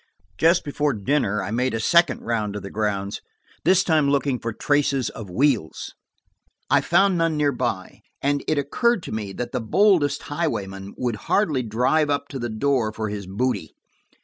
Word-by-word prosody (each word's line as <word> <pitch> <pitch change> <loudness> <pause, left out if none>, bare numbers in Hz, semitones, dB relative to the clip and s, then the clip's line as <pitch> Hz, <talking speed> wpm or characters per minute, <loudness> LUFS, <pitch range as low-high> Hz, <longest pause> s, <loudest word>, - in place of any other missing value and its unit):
Just 170 +2 +4
before 145 0 0
dinner 105 -2 0
I - - -4
made 125 +2 0
a - - -1
second 170 +3 +3
round 110 -3 -2
of 105 - -5
the 100 - -7
grounds, 100 -2 -2 0.4
this 185 +2 +5
time 155 -4 +2
looking 140 -2 +1
for 115 - -3
traces 140 -1 0
of 105 -4 -9
wheels. 120 - 0 0.8
I - - +5
found 185 +1 +3
none 165 -2 +1
near 145 -1 +2
by, 120 -7 -3 0.2
and 140 0 0
it 155 - +1
occurred 195 - +1
to - - -7
me 105 -2 -4
that 120 +4 -5
the 125 - -2
boldest 145 - +3
highwayman 100 - -4
would 120 -3 -2
hardly 155 -11 +2
drive 125 +7 +1
up 140 0 -1
to 135 - -6
the 120 -1 -3
door 115 0 0
for 110 0 -4
his 100 -2 -6
booty. 100 -2 -2
130 Hz, 175 wpm, -23 LUFS, 110-150 Hz, 0.8 s, this